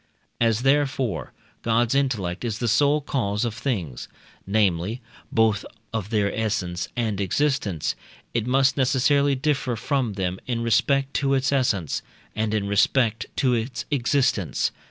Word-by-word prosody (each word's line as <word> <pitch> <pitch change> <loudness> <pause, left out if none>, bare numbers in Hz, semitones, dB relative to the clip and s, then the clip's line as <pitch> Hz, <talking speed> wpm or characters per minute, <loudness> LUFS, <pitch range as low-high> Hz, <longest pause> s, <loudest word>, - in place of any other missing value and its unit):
As, 115 0 +2
therefore, 135 -4 +1 0.3
God's 115 +1 +2
intellect 115 -10 0
is 115 -3 -2
the 120 - -2
sole 145 +6 +3
cause 115 -7 -1
of 115 - -2
things, 105 - -3 0.4
namely, 100 +1 +1 0.3
both 110 -2 +2 0.3
of 105 -3 -3
their 105 -3 +1
essence 90 -6 -2
and 110 -4 -1
existence, 100 - 0 0.4
it 115 -1 -1
must 135 +2 +3
necessarily 140 +2 +3
differ 135 -3 0
from 125 -1 -1
them 95 -1 -2
in 120 -2 -1
respect 135 +4 +2
to 140 -1 +2
its 135 +1 +1
essence, 115 - 0 0.3
and 110 0 0
in 105 -2 0
respect 110 +3 +2
to 130 -2 +2
its 120 +1 -2
existence. 130 - +1
115 Hz, 135 wpm, -24 LUFS, 105-135 Hz, 0.4 s, sole